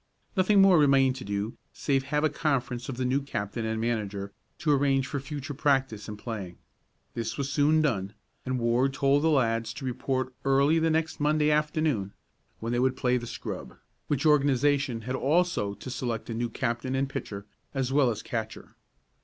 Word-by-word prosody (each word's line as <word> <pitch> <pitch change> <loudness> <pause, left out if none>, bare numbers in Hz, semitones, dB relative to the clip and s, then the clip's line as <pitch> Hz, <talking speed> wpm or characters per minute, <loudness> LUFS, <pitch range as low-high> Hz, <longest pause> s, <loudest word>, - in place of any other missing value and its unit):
Nothing 195 +1 +5
more 190 -4 +6
remained 135 -3 +4
to 130 - -7
do 100 +2 -3
save 135 -2 0
to 135 - -14
have 150 +2 0
a 155 - +4
conference 135 -5 -1
of 130 - -4
the 130 - -1
new 130 +3 +1
captain 110 -4 -4
and 110 0 -2
manager, 105 -4 -2 0.2
to 155 - +1
arrange 135 -1 +3
for 140 - -3
future 140 +1 -6
practice 135 -6 0
and 105 -1 -6
playing. 100 -6 -6 0.6
This 115 -1 -3
was 140 -1 -2
soon 155 +2 +3
done, 100 -9 -1 0.3
and 130 0 -2
Ward 125 +3 +1
told 140 +1 +3
the 160 - +3
lads 115 -5 +1
to 140 - -6
report 130 +1 -2
early 140 +4 +4
the 165 0 +2
next 160 0 0
Monday 150 0 +2
afternoon, 150 -9 0 0.5
when 115 +2 -3
they 120 - +1
would 130 0 +1
play 125 -2 +2
the 120 -1 -6
scrub, - - -6 0.3
which 145 +1 -1
organization 145 -3 +3
had 125 +3 -4
also 145 - +1
to 105 - -9
select 120 -2 -3
a - - -2
new 120 +1 -2
captain 120 +2 -2
and 135 +1 +1
pitcher, 100 -6 -6 0.3
as 135 -1 -1
well 140 -3 +4
as 110 - -4
catcher. 110 -2 -5
130 Hz, 185 wpm, -28 LUFS, 115-145 Hz, 0.6 s, more